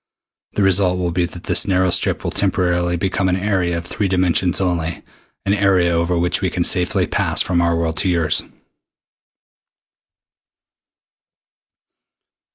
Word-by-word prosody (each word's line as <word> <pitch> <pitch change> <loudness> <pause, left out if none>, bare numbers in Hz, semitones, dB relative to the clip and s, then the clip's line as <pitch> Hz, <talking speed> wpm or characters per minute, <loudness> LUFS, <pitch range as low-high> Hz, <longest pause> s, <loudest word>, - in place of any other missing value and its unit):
The 105 - 0
result 95 -1 +3
will 90 -1 -2
be 85 +1 0
that 90 0 -10
this - - +2
narrow 95 -1 +2
strip - - +1
will - - -3
temporarily 90 -2 0
become 95 +2 -1
an 90 - +1
area 95 -3 -1
of 85 - -6
three 100 +3 -2
dimensions 90 -1 +1
only, 85 -3 -2 0.4
an 100 - +1
area 95 -4 +2
over 85 +1 0
which 85 +1 0
we 95 - 0
can 90 0 -2
safely 90 0 +1
pass - - +1
from 85 -2 0
our 85 0 +1
world 85 -1 -2
to 95 - 0
yours." 85 -4 +1
90 Hz, 145 wpm, -19 LUFS, 85-95 Hz, 0.4 s, result